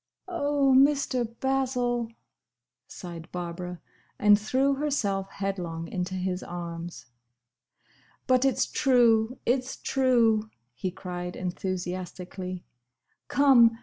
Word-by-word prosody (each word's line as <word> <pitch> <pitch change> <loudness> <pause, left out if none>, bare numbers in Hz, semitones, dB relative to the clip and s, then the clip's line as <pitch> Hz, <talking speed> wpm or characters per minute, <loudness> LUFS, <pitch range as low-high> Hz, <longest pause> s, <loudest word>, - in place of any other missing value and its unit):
'" - - -58
"Oh, 285 -6 +2
Mr. 270 -4 +3
Basil!" 250 -3 0 0.8
sighed 170 -1 -9
Barbara, 180 0 -5 0.4
and 205 0 +6
threw 260 +6 +2
herself 225 -10 -1
headlong 175 -5 -4
into 180 0 -3
his 185 0 -2
arms. 170 -1 -7 1.2
"But 255 0 +3
it's 270 -1 +2
true!—It's 245 0 +2
true!" 230 -5 +2 0.2
he 155 +10 -3
cried 180 -1 -6
enthusiastically. 185 0 -4 0.6
"Come! 240 -5 +5
210 Hz, 90 wpm, -27 LUFS, 180-260 Hz, 1.2 s, and